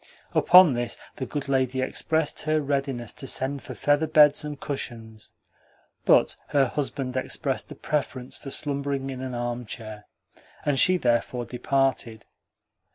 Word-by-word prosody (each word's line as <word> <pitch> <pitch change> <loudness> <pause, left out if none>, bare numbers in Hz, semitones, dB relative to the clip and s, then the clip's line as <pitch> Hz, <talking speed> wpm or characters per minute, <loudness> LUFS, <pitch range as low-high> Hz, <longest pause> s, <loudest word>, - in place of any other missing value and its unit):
Upon 180 -5 +7
this 120 0 -3 0.2
the 130 - -4
good 145 -1 -4
lady 130 -1 +1
expressed 155 +4 -1
her 155 0 +1
readiness 135 -5 -2
to 135 - -8
send 135 +1 0
for - - -9
feather 145 +2 +2
beds 150 -2 +5
and 150 -1 -6
cushions, 115 -6 -6 0.7
but - - +4
her 140 -2 +3
husband 135 -2 -3
expressed 130 - -2
a - - -7
preference 130 -4 -3
for 140 - -9
slumbering 140 -1 -2
in 130 -1 -6
an 130 -1 -5
armchair, 120 -3 -5 0.6
and 145 -2 +1
she 185 0 +5
therefore 120 -2 0
departed. 125 -2 -1
135 Hz, 140 wpm, -25 LUFS, 120-145 Hz, 0.7 s, Upon